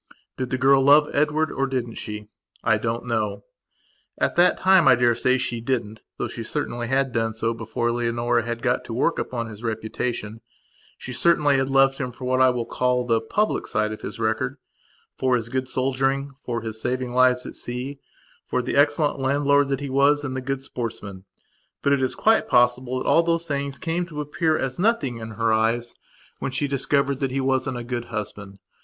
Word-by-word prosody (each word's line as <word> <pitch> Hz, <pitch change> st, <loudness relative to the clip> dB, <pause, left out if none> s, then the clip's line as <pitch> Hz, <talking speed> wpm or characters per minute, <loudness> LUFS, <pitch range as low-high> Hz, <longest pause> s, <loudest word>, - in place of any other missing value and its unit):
Did 130 Hz, -1 st, -3 dB
the 130 Hz, -, -1 dB
girl 135 Hz, +1 st, +5 dB
love 145 Hz, +2 st, +5 dB
Edward, 150 Hz, +2 st, +1 dB
or 135 Hz, -, -1 dB
didn't 125 Hz, -3 st, -3 dB
she? 105 Hz, -1 st, -6 dB, 0.4 s
I 110 Hz, -2 st, +3 dB
don't 115 Hz, +2 st, -2 dB
know. 105 Hz, -4 st, -2 dB, 0.7 s
At -, -, 0 dB
that 175 Hz, +1 st, +4 dB
time 190 Hz, -2 st, +5 dB
I -, -, +8 dB
daresay 120 Hz, +1 st, +2 dB
she 120 Hz, -2 st, -2 dB
didn't 115 Hz, -3 st, -2 dB, 0.2 s
though -, -, -2 dB
she 115 Hz, -, -7 dB
certainly 120 Hz, -1 st, -3 dB
had 135 Hz, +1 st, +1 dB
done 115 Hz, -1 st, -1 dB
so 115 Hz, +1 st, -1 dB
before 115 Hz, +1 st, -2 dB
Leonora 120 Hz, 0 st, 0 dB
had 115 Hz, 0 st, -5 dB
got 125 Hz, -, +1 dB
to 115 Hz, -, -5 dB
work 165 Hz, +7 st, +1 dB
upon 120 Hz, -2 st, -3 dB
his 110 Hz, -2 st, -10 dB
reputation. 110 Hz, 0 st, -4 dB, 0.6 s
She 130 Hz, -, -7 dB
certainly 145 Hz, +1 st, +3 dB
had 135 Hz, 0 st, 0 dB
loved 135 Hz, 0 st, +3 dB
him 125 Hz, -3 st, -3 dB
for 130 Hz, +1 st, -9 dB
what 130 Hz, +1 st, +2 dB
I 130 Hz, 0 st, +6 dB
call 125 Hz, +1 st, 0 dB
the 115 Hz, -2 st, +2 dB
public 210 Hz, -, -1 dB
side 110 Hz, 0 st, 0 dB
of 110 Hz, -, -7 dB
his -, -, -6 dB
recordfor 115 Hz, +3 st, -3 dB
his 115 Hz, -1 st, -3 dB
good 130 Hz, +1 st, -2 dB
soldiering, 135 Hz, +1 st, 0 dB
for 120 Hz, -1 st, -3 dB
his 110 Hz, -1 st, -6 dB
saving 125 Hz, 0 st, -2 dB
lives 125 Hz, 0 st, +3 dB
at -, -, -7 dB
sea, 125 Hz, +3 st, -5 dB, 0.5 s
for 125 Hz, -, -1 dB
the -, -, -3 dB
excellent 145 Hz, 0 st, +2 dB
landlord 140 Hz, +1 st, +2 dB
that 135 Hz, 0 st, -2 dB
he 140 Hz, -, -4 dB
was 140 Hz, +2 st, +3 dB
and 130 Hz, -2 st, -4 dB
the 130 Hz, -, -3 dB
good 135 Hz, +1 st, -3 dB
sportsman. 110 Hz, -7 st, -6 dB, 0.6 s
But 140 Hz, -, +3 dB
it 140 Hz, -, +1 dB
is 130 Hz, -, 0 dB
quite 225 Hz, +1 st, +3 dB
possible 125 Hz, +1 st, +2 dB
that -, -, -4 dB
all -, -, +5 dB
those 170 Hz, 0 st, 0 dB
things 140 Hz, -2 st, -3 dB
came 175 Hz, 0 st, -2 dB
to 150 Hz, -4 st, -7 dB
appear 155 Hz, +2 st, 0 dB
as 130 Hz, +2 st, -3 dB
nothing 180 Hz, -, +1 dB
in 110 Hz, 0 st, -7 dB
her 115 Hz, 0 st, +1 dB
eyes 115 Hz, +2 st, +1 dB, 0.5 s
when -, -, -3 dB
she 145 Hz, +2 st, -1 dB
discovered 140 Hz, 0 st, +1 dB
that 135 Hz, -, 0 dB
he 135 Hz, +2 st, -2 dB
wasn't 130 Hz, -1 st, 0 dB
a 120 Hz, -, -5 dB
good 120 Hz, 0 st, -4 dB
husband. 105 Hz, -2 st, -6 dB
130 Hz, 195 wpm, -24 LUFS, 115-140 Hz, 0.7 s, I